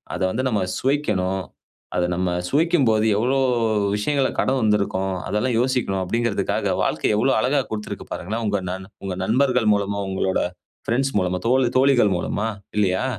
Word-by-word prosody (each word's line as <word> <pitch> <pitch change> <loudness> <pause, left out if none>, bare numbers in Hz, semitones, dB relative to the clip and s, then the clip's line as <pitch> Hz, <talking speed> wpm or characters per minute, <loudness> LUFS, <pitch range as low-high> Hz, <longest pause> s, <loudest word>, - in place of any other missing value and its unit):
அத - - -5
வந்து 130 - -2
நம்ம 105 -4 0 0.2
சுவைக்கணும். 105 -9 0 0.5
அத 90 - +2
நம்ம 90 0 0 0.2
சுவைக்கும் 155 -2 +2
போது 110 0 +2
எவ்ளோ 125 +5 +1 0.6
விஷயங்கள்ல 135 +6 0
கடந்து 130 -1 +1
வந்திருக்கோம். 100 -3 +1
அதெல்லாம் 120 +4 0
யோசிக்கணும் 125 -7 0
அப்டிங்கிறதுக்காக 115 +3 0
வாழ்க்கை - - 0
எவ்வளவு 130 +2 +2
அழகா 135 +5 +2
குடுத்திருக்கு 105 -1 -5
பாருங்களேன். 110 +6 -4
உங்க 100 -1 +1
நண் 95 +1 -6 0.2
உங்க 95 -2 -3
நண்பர்கள் 125 -1 +2
மூலமா 100 0 -2
உங்களோட 95 0 0 0.5
பிரெண்ட்ஸ் 135 +2 0
மூலமா, 90 -1 -1
தோ - - +3 0.3
தோழிகள் 130 -7 +4
மூலமா 105 +5 -2 0.3
இல்லியா? 95 -1 +2
110 Hz, 145 wpm, -22 LUFS, 95-130 Hz, 0.6 s, தோழிகள்